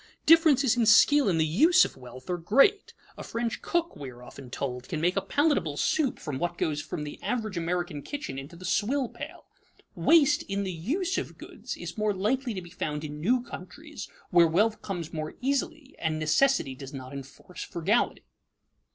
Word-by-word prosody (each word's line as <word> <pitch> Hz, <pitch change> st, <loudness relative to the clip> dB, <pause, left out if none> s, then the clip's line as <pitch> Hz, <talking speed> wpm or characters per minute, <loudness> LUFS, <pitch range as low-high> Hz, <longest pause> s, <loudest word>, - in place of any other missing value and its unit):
Differences 295 Hz, -6 st, +5 dB
in 235 Hz, -2 st, +2 dB
skill 255 Hz, +3 st, +6 dB
in 170 Hz, -, +1 dB
the 160 Hz, -, +3 dB
use 315 Hz, -, +5 dB
of -, -, -7 dB
wealth 130 Hz, 0 st, -12 dB
are 180 Hz, -1 st, -2 dB
great. 275 Hz, -, +3 dB, 0.2 s
A -, -, -5 dB
French 230 Hz, 0 st, -3 dB
cook, 340 Hz, -1 st, -1 dB
we 140 Hz, -2 st, -7 dB
are 125 Hz, 0 st, -13 dB
often 130 Hz, +1 st, -11 dB
told, 125 Hz, -1 st, -5 dB
can 155 Hz, -, -2 dB
make 175 Hz, +3 st, +1 dB
a 195 Hz, -, +1 dB
palatable 200 Hz, -, +1 dB
soup 280 Hz, -, +1 dB
from 145 Hz, -4 st, -5 dB
what 175 Hz, 0 st, -2 dB
goes 150 Hz, -1 st, -1 dB
from 150 Hz, -, -5 dB
the 145 Hz, -, -8 dB
average 220 Hz, -5 st, -2 dB
American 170 Hz, -3 st, -2 dB
kitchen 280 Hz, -, -5 dB
into 140 Hz, +6 st, -10 dB
the 185 Hz, +2 st, -10 dB
swill 255 Hz, +6 st, 0 dB
pail. 290 Hz, +8 st, -9 dB, 0.5 s
Waste 300 Hz, -3 st, +4 dB
in 200 Hz, 0 st, -1 dB
the 190 Hz, -2 st, -3 dB
use 320 Hz, -, -1 dB
of -, -, -7 dB
goods -, -, -8 dB
is -, -, -7 dB
more 210 Hz, -1 st, +1 dB
likely 235 Hz, +5 st, -1 dB
to 185 Hz, -, -5 dB
be 175 Hz, -, -13 dB
found 150 Hz, -4 st, -4 dB
in 150 Hz, 0 st, -6 dB
new 245 Hz, +8 st, +2 dB
countries -, -, -9 dB, 0.2 s
where 175 Hz, -2 st, +6 dB
wealth 210 Hz, +7 st, +1 dB
comes 175 Hz, -5 st, -5 dB
more 155 Hz, -1 st, -4 dB
easily 280 Hz, +2 st, -2 dB
and 160 Hz, -1 st, -1 dB
necessity 155 Hz, -, +2 dB
does 135 Hz, +1 st, -10 dB
not 130 Hz, 0 st, -8 dB
enforce 140 Hz, +6 st, -10 dB
frugality. 195 Hz, +8 st, 0 dB
185 Hz, 190 wpm, -28 LUFS, -, 0.5 s, skill